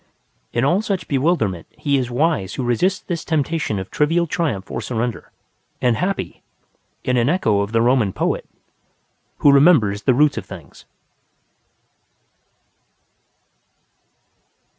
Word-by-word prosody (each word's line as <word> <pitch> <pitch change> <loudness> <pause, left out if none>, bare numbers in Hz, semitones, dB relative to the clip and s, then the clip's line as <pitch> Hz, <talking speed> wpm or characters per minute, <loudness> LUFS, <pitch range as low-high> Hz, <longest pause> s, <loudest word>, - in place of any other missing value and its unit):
In 120 +2 0
all 175 +8 +2
such 195 -4 -3
bewilderment 130 - 0
he 145 -2 0
is 125 -2 -3
wise 125 - 0
who 130 - -3
resists 150 - +1
this 170 -2 -4
temptation 155 -7 -1
of 95 0 -6
trivial 165 +4 +2
triumph 145 - -2
or - - -3
surrender, 120 -1 -3 0.5
and 125 -2 +2
happy 185 - -3 0.6
(in 125 0 +1
an 120 +2 +2
echo 110 - +2
of 100 +1 -3
the 115 0 +2
Roman 120 -5 +3
poet) - - -2 0.9
who 145 - +5
remembers 135 - +4
the 125 +4 +2
roots 145 -3 +3
of 95 - -10
things. 85 -8 -12
130 Hz, 125 wpm, -20 LUFS, 110-165 Hz, 0.9 s, who